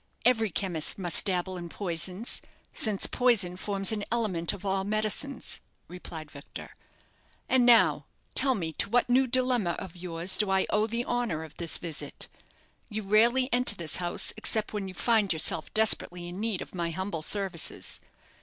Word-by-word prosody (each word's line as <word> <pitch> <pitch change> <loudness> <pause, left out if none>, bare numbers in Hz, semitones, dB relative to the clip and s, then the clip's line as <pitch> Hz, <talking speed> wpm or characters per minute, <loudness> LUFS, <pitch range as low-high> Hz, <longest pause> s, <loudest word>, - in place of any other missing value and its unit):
"Every 225 -3 +4
chemist 175 -4 0
must 175 -4 +3
dabble 185 -1 -1
in 175 -1 -6
poisons, 185 +4 -2 0.3
since 210 -4 +2
poison 230 -8 +2
forms 195 +1 0
an 210 -2 -2
element 200 -8 0
of 200 -1 -9
all 195 0 +1
medicines," 215 +7 -1 0.3
replied 165 -4 -8
Victor. 140 0 -10 0.7
"And 250 -2 +4
now 235 -2 +5 0.3
tell 265 -2 +2
me 165 -6 -3
to - - +1
what 245 +2 +2
new 260 +1 +4
dilemma 250 -7 +2
of 185 - -7
yours 175 0 0
do 210 -2 +2
I 190 0 +2
owe 210 +1 +2
the 235 +2 -2
honour 235 -10 -1
of 160 - -12
this 170 -2 -1
visit. 165 -4 -5 0.6
You 215 -1 -3
rarely 235 +6 +4
enter 245 -4 +4
this 170 -5 -3
house 175 -1 +1
except 220 -1 0
when 205 -2 -3
you 185 - -8
find 220 -1 +2
yourself 165 0 -2
desperately 180 -5 +1
in 175 +2 -7
need 220 -3 -1
of - - -15
my 170 -2 -2
humble 180 0 -3
services. 190 -1 0
195 Hz, 165 wpm, -28 LUFS, 175-225 Hz, 0.7 s, now